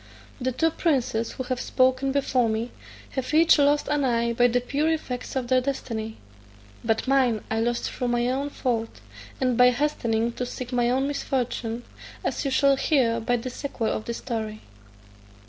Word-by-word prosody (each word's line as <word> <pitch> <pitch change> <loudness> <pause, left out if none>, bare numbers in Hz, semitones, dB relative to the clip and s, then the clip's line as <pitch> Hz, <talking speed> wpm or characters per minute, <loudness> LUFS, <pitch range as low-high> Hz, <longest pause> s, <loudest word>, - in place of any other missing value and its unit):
The 260 +1 0
two 325 +6 +1
princes 255 -9 0
who 260 - -4
have 250 -1 -3
spoken 260 +1 +2
before 260 -4 +1
me 220 +2 -2 0.4
have 265 +3 -2
each 325 -1 +6
lost 290 +1 +3
an 295 -1 +1
eye 235 -2 +1
by 245 +1 +4
the 245 +1 +2
pure 285 +5 0
effects 260 -5 -4
of 255 -2 -1
their 255 0 +3
destiny, 225 -5 -4 0.7
but 225 +2 0
mine 255 -5 +2
I 220 - +1
lost 235 +1 -1
through 250 - -3
my 240 0 +1
own 270 +3 -1
fault, 230 -5 -2 0.4
and 255 -2 +1
by 250 +1 +7
hastening 235 -4 0
to 250 - -4
seek 250 0 -6
my 240 -1 +2
own 265 +2 +1
misfortune, 245 -4 -2 0.4
as - - -1
you 275 - 0
shall 275 +1 +4
hear 245 -6 +2
by 245 +2 +1
the 250 +2 -5
sequel 245 -4 -3
of 215 - -3
the 235 - -3
story. 220 -3 -4
250 Hz, 180 wpm, -25 LUFS, 235-270 Hz, 0.7 s, by